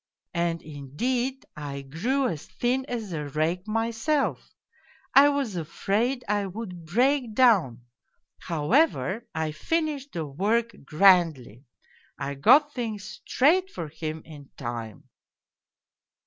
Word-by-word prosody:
And, 170 Hz, -1 st, -1 dB
indeed, 240 Hz, -, -3 dB
I 140 Hz, -2 st, -6 dB
grew 240 Hz, -, 0 dB
as 160 Hz, -9 st, -5 dB
thin 255 Hz, +2 st, -1 dB
as 225 Hz, -8 st, -4 dB
a 150 Hz, -2 st, -3 dB
rake 160 Hz, +5 st, -1 dB
mj^self, 230 Hz, +6 st, 0 dB, 0.7 s
I 280 Hz, +1 st, +8 dB
was 280 Hz, -8 st, -1 dB
afraid 205 Hz, -, -1 dB
I 205 Hz, -1 st, 0 dB
would 180 Hz, -4 st, -8 dB
break 245 Hz, -, +1 dB
down. 185 Hz, -, +4 dB, 0.6 s
However, 215 Hz, -, +1 dB
I 160 Hz, -1 st, -1 dB
finished 295 Hz, -, -2 dB
the 165 Hz, -3 st, -3 dB
work 210 Hz, +11 st, 0 dB
grandly. 155 Hz, -, +3 dB, 0.5 s
I 140 Hz, 0 st, -3 dB
got 290 Hz, -, +5 dB
things 220 Hz, -6 st, -5 dB
straight 355 Hz, +8 st, +3 dB
for 165 Hz, -, -6 dB
him 155 Hz, 0 st, -6 dB
in 145 Hz, -4 st, -12 dB
time. 115 Hz, -5 st, -6 dB
195 Hz, 115 wpm, -26 LUFS, 155-250 Hz, 0.7 s, I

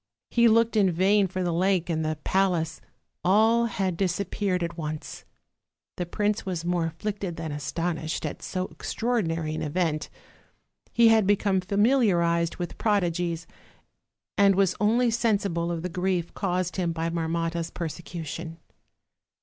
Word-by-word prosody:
He 235 Hz, -1 st, +5 dB
looked 230 Hz, +1 st, +3 dB
in 200 Hz, -3 st, +4 dB
vain 195 Hz, +4 st, +3 dB
for 185 Hz, 0 st, -3 dB
the 175 Hz, -1 st, 0 dB
lake 185 Hz, 0 st, +1 dB
and 160 Hz, -2 st, -1 dB
the 155 Hz, 0 st, -1 dB
palace; 175 Hz, -4 st, +1 dB, 0.4 s
all 220 Hz, +5 st, +4 dB
had 190 Hz, -5 st, -1 dB
disappeared 185 Hz, 0 st, -1 dB
at 170 Hz, 0 st, -4 dB
once. 155 Hz, -2 st, -6 dB, 0.7 s
The 175 Hz, -, -3 dB
prince 210 Hz, +3 st, 0 dB
was 175 Hz, -3 st, -4 dB
more 175 Hz, -1 st, +1 dB
afflicted 195 Hz, +2 st, -4 dB
than 160 Hz, -2 st, -5 dB
astonished 160 Hz, +2 st, -3 dB
at -, -, -5 dB
so 185 Hz, -1 st, -3 dB
extraordinary 165 Hz, -10 st, -1 dB
[an -, -, -3 dB
event; 155 Hz, 0 st, -1 dB, 0.8 s
he 235 Hz, -1 st, +5 dB
had 220 Hz, -3 st, +4 dB
become 200 Hz, -2 st, +2 dB
familiarized 185 Hz, -5 st, +2 dB
with 175 Hz, -1 st, -6 dB
prodigies, 175 Hz, -5 st, 0 dB, 0.9 s
and 200 Hz, -1 st, +6 dB
was 190 Hz, -1 st, +3 dB
only 235 Hz, +3 st, +3 dB
sensible 200 Hz, -7 st, 0 dB
of 170 Hz, -1 st, -3 dB
the -, -, -1 dB
grief 180 Hz, -1 st, -1 dB
caused 180 Hz, -2 st, -1 dB
him 175 Hz, -3 st, 0 dB
by 165 Hz, 0 st, -2 dB
Marmotta's 165 Hz, 0 st, -2 dB
persecution. 165 Hz, -1 st, -6 dB
180 Hz, 140 wpm, -26 LUFS, 165-200 Hz, 0.9 s, and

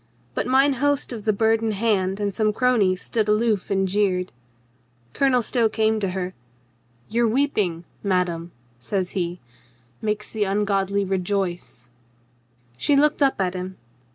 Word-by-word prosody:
But -, -, -2 dB
mine 270 Hz, +2 st, +4 dB
host 285 Hz, -2 st, +1 dB
of 220 Hz, -3 st, -7 dB
the 215 Hz, -, +4 dB
Bird 220 Hz, +2 st, +2 dB
in 225 Hz, -1 st, 0 dB
Hand 195 Hz, -2 st, 0 dB
and 205 Hz, -1 st, -1 dB
some 215 Hz, +1 st, +1 dB
cronies 205 Hz, -7 st, +2 dB
stood 220 Hz, -2 st, -1 dB
aloof 215 Hz, -2 st, +1 dB
,and 195 Hz, -1 st, +1 dB
jeered. 185 Hz, -2 st, 0 dB, 0.8 s
Colonel 260 Hz, -3 st, +2 dB
Stow 230 Hz, -1 st, +1 dB
came 220 Hz, 0 st, +1 dB
to 195 Hz, -2 st, -1 dB
her. 185 Hz, 0 st, -3 dB, 0.7 s
"Your 235 Hz, +2 st, +1 dB
weeping, 215 Hz, -, 0 dB, 0.2 s
madame," 180 Hz, -3 st, -1 dB, 0.3 s
says 185 Hz, -, -2 dB
he, 175 Hz, -1 st, -3 dB, 0.6 s
"makes 210 Hz, -1 st, -2 dB
the 215 Hz, -2 st, 0 dB
ungodly 200 Hz, 0 st, 0 dB
re 190 Hz, 0 st, 0 dB
joice." 175 Hz, -, -3 dB, 0.9 s
She 285 Hz, -, +2 dB
looked 295 Hz, +2 st, +3 dB
up 270 Hz, -5 st, +3 dB
at 185 Hz, -2 st, 0 dB
him. 185 Hz, 0 st, -6 dB
205 Hz, 150 wpm, -23 LUFS, 185-225 Hz, 0.9 s, mine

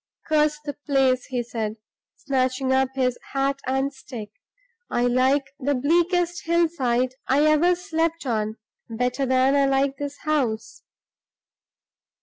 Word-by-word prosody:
"Curse 300 Hz, -1 st, +2 dB
the 290 Hz, -, -3 dB
place!" 265 Hz, -3 st, +2 dB
he 250 Hz, -2 st, -2 dB
said, 220 Hz, -2 st, -4 dB, 0.4 s
snatching 260 Hz, -1 st, 0 dB
up 265 Hz, 0 st, +2 dB
his 250 Hz, -2 st, 0 dB
hat 275 Hz, 0 st, 0 dB
and 270 Hz, +2 st, 0 dB
stick. 245 Hz, -6 st, -9 dB, 0.6 s
"I 240 Hz, -, 0 dB
like 260 Hz, +3 st, +3 dB, 0.2 s
the 285 Hz, +1 st, 0 dB
bleakest 345 Hz, +5 st, +1 dB
hillside 270 Hz, -8 st, +1 dB
I 280 Hz, +3 st, +3 dB
ever 310 Hz, +4 st, +4 dB
slept 330 Hz, -3 st, -2 dB
on 215 Hz, -3 st, -1 dB, 0.3 s
better 250 Hz, +4 st, -1 dB
than 260 Hz, +2 st, +3 dB
I 280 Hz, -1 st, +4 dB
like 270 Hz, 0 st, +1 dB
this 285 Hz, 0 st, -5 dB
house!" 250 Hz, -8 st, -1 dB
270 Hz, 130 wpm, -24 LUFS, 255-300 Hz, 0.6 s, ever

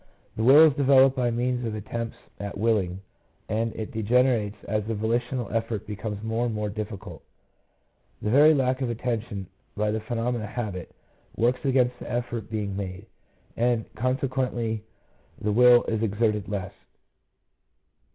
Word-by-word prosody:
The -, -, -3 dB
will 140 Hz, +6 st, +8 dB
is 155 Hz, -, +4 dB
developed 135 Hz, -1 st, +5 dB
by 125 Hz, -2 st, +1 dB
means 125 Hz, +1 st, -1 dB
of 110 Hz, -2 st, -3 dB
attempts 115 Hz, +2 st, -5 dB, 0.2 s
at 100 Hz, -1 st, -5 dB
willing, 100 Hz, -4 st, 0 dB, 0.5 s
and 115 Hz, +2 st, -1 dB
it 110 Hz, +4 st, -5 dB
degenerates 115 Hz, -2 st, +2 dB
as 105 Hz, -1 st, -1 dB
the 115 Hz, -, -1 dB
volitional 120 Hz, +2 st, -1 dB
effort 115 Hz, -1 st, -2 dB
becomes 105 Hz, 0 st, -5 dB
more 115 Hz, +2 st, 0 dB
and 115 Hz, -, -3 dB
more 105 Hz, 0 st, -2 dB
difficult: 105 Hz, -4 st, -6 dB, 1.0 s
the 105 Hz, -, -2 dB
very 150 Hz, +4 st, +7 dB
lack 130 Hz, -1 st, +1 dB
of 130 Hz, -, 0 dB
attention, 115 Hz, -4 st, -3 dB, 0.3 s
by 105 Hz, 0 st, +1 dB
the 110 Hz, -, -1 dB
phenomena 115 Hz, +1 st, -2 dB
of -, -, -8 dB
habit, 105 Hz, -8 st, -5 dB, 0.4 s
works 120 Hz, +2 st, +1 dB
against 125 Hz, -2 st, +2 dB
the -, -, -7 dB
effort 120 Hz, -3 st, -3 dB
being 105 Hz, -3 st, -3 dB
made, 95 Hz, 0 st, -5 dB, 0.5 s
and 120 Hz, -1 st, 0 dB
consequently 125 Hz, -2 st, -1 dB, 0.6 s
the 105 Hz, -, -1 dB
will 120 Hz, +2 st, +7 dB
is 110 Hz, -1 st, -2 dB
exerted 105 Hz, -1 st, 0 dB
less. 100 Hz, -1 st, -4 dB
115 Hz, 150 wpm, -26 LUFS, 105-125 Hz, 1.0 s, will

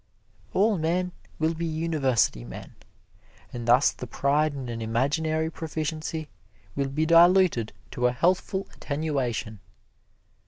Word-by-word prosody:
All 205 Hz, -1 st, +3 dB
men 180 Hz, +3 st, 0 dB, 0.3 s
will 160 Hz, +1 st, +1 dB
be 165 Hz, +1 st, -5 dB
university 155 Hz, -, +1 dB
men, -, -, -9 dB, 0.8 s
and 120 Hz, -1 st, -5 dB
thus 125 Hz, +4 st, +5 dB
the -, -, -8 dB
pride 145 Hz, +2 st, +1 dB
in 135 Hz, -2 st, -5 dB
an 115 Hz, -1 st, -5 dB
imaginary 155 Hz, +8 st, 0 dB
proficiency 160 Hz, 0 st, -4 dB, 0.5 s
will 140 Hz, -1 st, -1 dB
be 155 Hz, +4 st, 0 dB
diluted 170 Hz, -, +5 dB, 0.2 s
to 125 Hz, 0 st, +1 dB
a -, -, +1 dB
healthful 185 Hz, +7 st, 0 dB
attenuation. 135 Hz, -8 st, -3 dB
155 Hz, 120 wpm, -26 LUFS, 125-165 Hz, 0.8 s, thus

